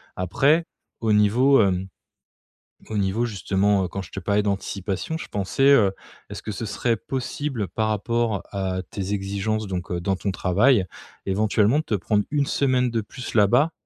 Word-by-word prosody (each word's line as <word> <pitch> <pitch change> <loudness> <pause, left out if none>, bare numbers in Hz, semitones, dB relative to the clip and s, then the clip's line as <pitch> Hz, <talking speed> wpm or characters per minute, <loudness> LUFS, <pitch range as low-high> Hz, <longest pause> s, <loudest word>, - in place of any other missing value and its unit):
Après 140 - +2 0.3
au 110 -2 +1
niveau, 115 +6 +4
hem, 95 -1 +1 1.0
au 110 - -2
niveau 100 +4 0
justement, 100 -1 +1
heu, - - -3
quand 100 +2 -5
je - - -13
te - - -5
parlais 100 +2 +1
d'anticipation, 100 - -3
je - - -8
pensais, 100 +6 -2
heu, 105 -8 +5 0.4
est-ce - - -8
que - - -4
ce 110 +3 -5
serait 115 +2 0
possible 130 -2 -3
par 110 +5 -1
rapport 110 -1 -1
à 95 -2 -2
tes 100 0 -4
exigences 100 +2 -2
donc 90 -2 -4
heu, 90 -1 -2
dans 95 +2 0
ton 100 +2 -3
travail, 100 +4 +3 0.4
éventuellement 105 +6 +2
de - - -2
te 110 - -1
prendre 105 +2 0
1 145 -1 +1
semaine 130 -3 +1
de 115 -1 0
plus 120 +4 -8
là-bas? 120 +9 +4
105 Hz, 175 wpm, -24 LUFS, 95-120 Hz, 1.0 s, heu